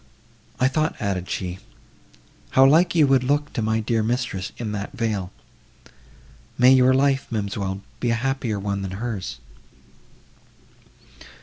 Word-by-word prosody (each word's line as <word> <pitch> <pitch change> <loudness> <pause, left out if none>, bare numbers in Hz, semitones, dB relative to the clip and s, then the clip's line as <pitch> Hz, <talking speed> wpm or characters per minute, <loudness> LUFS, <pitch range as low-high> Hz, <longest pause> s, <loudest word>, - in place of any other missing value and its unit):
"I 130 - +4
thought," 155 +4 0
added 95 -3 -2
she, 90 0 -4 1.0
"how 135 - +8
like 165 +6 +4
you 155 -3 +6
would 135 -2 +3
look 145 +2 0
to - - -2
my 110 +1 +1
dear 110 +1 0
mistress 115 -4 -2
in 110 -3 -4
that 100 -1 -5
veil;—may 100 - -3
your 130 0 +5
life, 135 0 +2
ma'amselle, 100 -3 -3 0.2
be 120 - 0
a 115 - +2
happier 125 -2 -2
one 100 0 -2
than 95 -1 -5
hers!" 110 - -4
115 Hz, 130 wpm, -23 LUFS, 100-130 Hz, 1.0 s, how